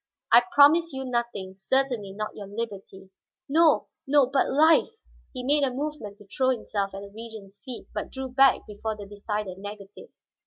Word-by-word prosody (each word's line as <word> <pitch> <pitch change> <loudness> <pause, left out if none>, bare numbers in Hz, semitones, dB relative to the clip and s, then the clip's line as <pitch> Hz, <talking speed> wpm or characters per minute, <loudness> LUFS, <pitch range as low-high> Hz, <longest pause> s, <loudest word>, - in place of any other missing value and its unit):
"I - - +9
promise 330 +1 +5
you 265 0 -4
nothing. 235 -6 -3
Certainly 225 0 -1
not 215 +1 -5
your 205 -2 -8
liberty." 195 -3 -7 0.4
"No, 315 +1 +4 0.2
no, 285 -1 +5
but 270 +2 +1
life!" 315 +4 +5 0.4
he 255 -2 -6
made 290 +3 +3
a 275 - +2
movement 260 -6 -5
to 205 - -16
throw 260 +6 0
himself 205 -5 -2
at 195 - -6
the 200 0 -10
Regent's 215 -2 -10
feet, 255 -3 -8
but - - -4
drew 265 0 -5
back 270 0 +4
before 215 +1 -5
the 205 - -8
decided 205 -1 -5
negative. 205 - -10
230 Hz, 170 wpm, -26 LUFS, 200-270 Hz, 0.4 s, I